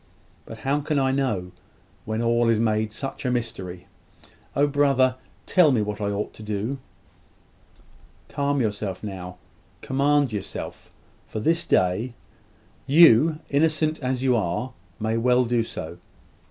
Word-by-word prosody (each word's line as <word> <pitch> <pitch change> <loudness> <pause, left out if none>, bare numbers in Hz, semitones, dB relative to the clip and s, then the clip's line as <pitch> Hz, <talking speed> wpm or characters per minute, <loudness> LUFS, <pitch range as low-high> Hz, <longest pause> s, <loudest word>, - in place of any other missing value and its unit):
But 115 - -8
how 140 +2 0
can 150 0 -1
I 135 -1 +2
know, 125 -10 -1 0.5
when 110 +1 -2
all 120 0 +2
is 115 -2 +3
made 110 -1 +1
such 135 +4 -6
a 130 - 0
mystery? 95 -7 -4 0.7
Oh, 140 +2 +4
brother, 135 -3 +2 0.3
tell 175 -6 +5
me 115 -5 +2
what 105 0 -4
I 100 - 0
ought 100 +1 -3
to - - -13
do!" 105 +5 -3 1.5
"Calm 140 0 -1
yourself 105 -4 -3
now. 90 -3 -7 0.4
Command 140 -1 +1
yourself; 100 -2 -6 0.4
for - - -5
this 165 +9 +1
day. 100 +7 +1 0.7
You, 155 +1 +6
innocent 155 +1 +1
as 130 -1 -1
you 130 -2 +3
are, 110 +5 -2 0.3
may 110 +1 0
well 125 +2 +3
do 120 0 +1
so. 85 -5 -7
120 Hz, 140 wpm, -24 LUFS, 105-140 Hz, 1.5 s, You